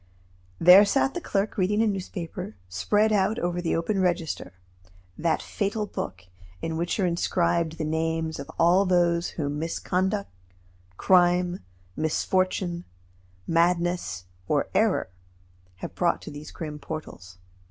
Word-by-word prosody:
There 180 +4 +9
sat 270 +6 +2
the 350 - -4
clerk 200 -7 -1
reading 210 +4 +2
a - - +3
newspaper, 185 - -4
spread 205 - +1
out 205 +2 +2
over 175 -3 -1
the 170 - 0
open 190 +4 0
register 175 - -1 0.6
that 165 - 0
fatal 210 +1 -2
book 95 - -6 0.3
in 165 - -3
which 170 +5 -1
are 190 - +3
inscribed 170 -1 0
the - - -2
names 160 0 -1
of 140 - -7
all 180 +4 +4
those 175 -1 +2
whom 145 -2 -2
misconduct, 185 +5 -1 0.7
crime, 180 -1 +3 0.4
misfortune, 175 +2 0 0.6
madness, 170 - +1 0.2
or - - +1
error 95 - +2 0.6
have 95 - -7
brought - - +1
to - - -7
these 145 +1 -9
grim 150 -2 -7
portals. 115 - -8
175 Hz, 130 wpm, -26 LUFS, 160-190 Hz, 0.7 s, There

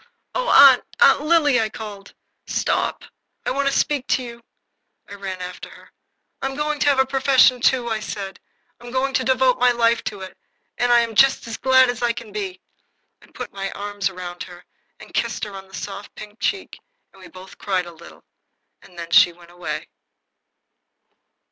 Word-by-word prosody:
"Oh, - - -2
Aunt - - +8 0.2
Aunt 475 -11 +6
Lily!" 300 -5 +3
I 220 - -1
called. 205 -3 -10 0.3
"Stop! - - -1 0.4
I - - 0
want 275 +1 0
to - - +2
speak 290 -3 0
to 260 - +1
you." 235 -1 -10 0.7
I - - -11
ran 190 -2 -6
after 180 0 -8
her. - - -17 0.5
"I'm 270 0 -3
going 300 0 -2
to - - +1
have 280 - +3
a 265 - +4
profession, 265 -2 +3
too," 245 -1 +2
I 220 -2 -1
said. 195 -3 -6 0.4
"I'm 240 - -11
going 260 +2 -1
to 260 - +1
devote 260 -1 +2
my 250 - +5
life 235 -1 +2
to 205 -2 -5
it, 190 - -10 0.4
and 245 0 +2
I 240 0 +6
am 230 -1 -3
just 270 +5 +4
as 230 - -6
glad 260 0 +5
as 245 -1 -3
I 240 -1 +1
can 230 -2 -9
be." 390 -3 -5 0.6
I - - -19
put - - -9
my 195 0 -4
arms 205 -1 -3
round 180 -1 -8
her 175 -1 -10 0.3
and - - -14
kissed - - -2
her 210 -2 -5
on 195 0 -9
her 190 - -23
soft, 200 +3 -8
pink 210 +1 -11
cheeks, 390 -1 -3 0.3
and 195 - -18
we 185 - -12
both 185 +1 -14
cried 185 -3 -1
a 175 - -10
little. 170 0 -15 0.6
Then 170 -2 -10
she 205 -1 +6
went 170 0 -18
away. 175 0 -6
230 Hz, 190 wpm, -21 LUFS, 195-260 Hz, 0.7 s, Aunt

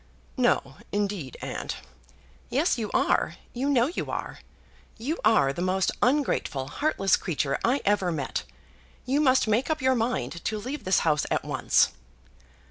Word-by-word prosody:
"No, - - +1
indeed, 200 - -2
aunt," - - -4 0.7
"Yes, 295 +7 +2
you 215 -2 -2
are; - - +2 0.2
you 265 +4 -1
know 245 -4 +4
you 330 +7 -3
are. - - -4 0.6
You 285 +9 -3
are 175 -12 +4
the 170 - -5
most 185 +1 +1
ungrateful, 250 - +1
heartless 195 - +2
creature 145 -5 -1
I 255 +4 +2
ever 195 -3 +2
met. 145 -5 -2 0.6
You 270 +4 +2
must 260 -5 +4
make 220 +7 +1
up 315 -1 0
your 260 0 +3
mind 230 -7 -2
to 215 - -1
leave 255 +4 -5
this 185 -1 +3
house 150 -3 +2
at - - 0
once." - - +3
220 Hz, 150 wpm, -27 LUFS, 180-260 Hz, 0.7 s, know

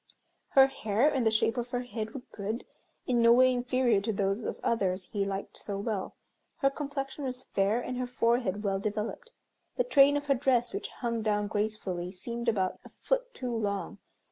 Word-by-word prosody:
Her 270 - +10
hair 225 -1 +1
and 265 -3 +1
the - - +6
shape 220 +1 +1
of 240 0 -2
her 245 0 -2
head 225 -2 -5
were 260 - -6
good, 215 +3 -4 0.4
in 240 -2 +2
no 230 0 +7
way 255 +1 +6
inferior 245 -3 +2
to 220 - -1
those 195 +2 0
of - - -4
others 190 -5 0
he 200 -2 +1
liked 195 0 -4
so 200 -2 -5
well. 205 -2 -3 0.4
Her 275 - +2
complexion 280 -1 -4
was 255 -1 -4
fair, 200 +4 +1
and 250 0 -4
her 250 - -1
forehead 230 -4 +1
well 195 -1 0
developed. 215 - -3 0.5
The - - +3
train 285 - +5
of 290 - -4
her 280 - +4
dress, 250 -2 +1
which - - -3
hung 235 -2 -3
down 210 -1 +1
gracefully, 205 -4 -2
seemed 235 +5 -3
about 190 -4 0
a - - -13
foot - - -1
too 245 -2 -3
long. 200 -3 -2
235 Hz, 195 wpm, -30 LUFS, 205-255 Hz, 0.5 s, Her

